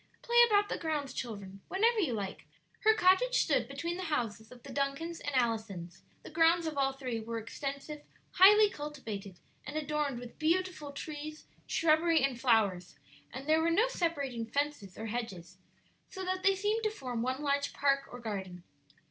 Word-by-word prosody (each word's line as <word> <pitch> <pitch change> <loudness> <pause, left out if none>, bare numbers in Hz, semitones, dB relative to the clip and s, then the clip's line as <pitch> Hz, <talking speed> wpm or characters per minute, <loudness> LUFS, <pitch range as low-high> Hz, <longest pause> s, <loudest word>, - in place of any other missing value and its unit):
"Play 475 0 0
about 410 -2 +3
the - - -3
grounds, 300 -5 -2
children, 200 -6 -6
whenever 450 +4 +2
you 315 - +1
like." 200 -3 -5 0.3
Her 440 0 +4
cottage 380 +7 +4
stood - - +1
between 340 +1 -4
the 370 - -4
houses 225 -8 -2
of 245 -1 -14
the 270 - -9
Duncans 280 +5 -2
and 290 - -4
Allisons; 215 -8 -1 0.2
the - - -10
grounds 330 +1 +4
of 315 -2 -3
all 270 -1 +2
three 255 -4 -4
were 230 +1 -5
extensive, 280 +6 -5 0.3
highly 415 +3 +8
cultivated, 230 - -7 0.3
and 295 +3 -5
adorned 300 -3 -1
with 245 -1 -11
beautiful 335 -2 0
trees, 305 +1 -7 0.2
shrubbery, 325 -1 +3
and 255 -3 0
flowers, 200 - +2 0.4
and 265 +3 -8
there 315 +1 +4
were 330 - +2
no 415 +9 +3
separating 280 - -2
fences 285 -8 -2
or 220 - -5
hedges, 195 -6 -5 0.5
so 380 -4 -6
that 370 0 -1
they 390 0 +4
seemed 420 +3 0
to 430 - +2
form 255 - -4
one 260 +4 -2
large 280 0 +1
park 275 -1 +1
or 245 - -8
garden. 190 -6 -5
280 Hz, 175 wpm, -32 LUFS, 230-335 Hz, 0.5 s, highly